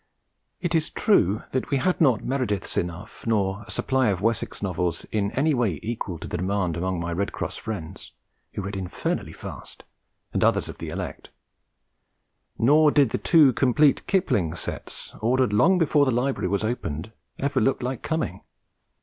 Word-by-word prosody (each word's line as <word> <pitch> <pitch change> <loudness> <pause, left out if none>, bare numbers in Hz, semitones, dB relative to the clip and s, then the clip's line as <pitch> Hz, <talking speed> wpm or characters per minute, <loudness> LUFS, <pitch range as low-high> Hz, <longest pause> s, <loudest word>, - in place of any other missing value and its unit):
It 175 -2 -2
is 160 -2 +1
true 110 - +2
that 130 - -2
we 140 - +2
had 180 +7 0
not 130 -8 +4
Merediths 125 -7 -1
enough, 85 0 -4
nor 100 -2 +1
a - - -16
supply 130 +2 +1
of 100 -4 +1
Wessex 115 0 -1
Novels 90 -3 -1
in 100 -2 0
any 150 +3 +2
way 110 - 0
equal 110 -6 -3
to - - -8
the - - -3
demand 90 -1 0
among 90 +1 -1
my 85 0 -3
Red 100 +4 -1
Cross - - -4
friends 95 -8 -6 0.4
(who 100 - -3
read 100 +1 -4
infernally 95 -2 -3
fast) - - -10 0.5
and - - +1
others - - +3
of - - -9
the - - -5
elect; - - -6 1.3
nor 150 +6 +5
did 145 -5 +3
the - - -1
two 150 -6 +5
complete 140 +2 +3
Kipling 100 - +1
sets, - - -6
ordered 125 0 +2
long 170 - +5
before 150 -4 +3
the - - +1
library 125 -4 0
was 100 +3 0
opened, 105 -5 -3 0.3
ever 140 +1 0
look 135 - +1
like 125 -1 -3
coming. 160 0 -2
110 Hz, 170 wpm, -25 LUFS, 95-135 Hz, 1.3 s, nor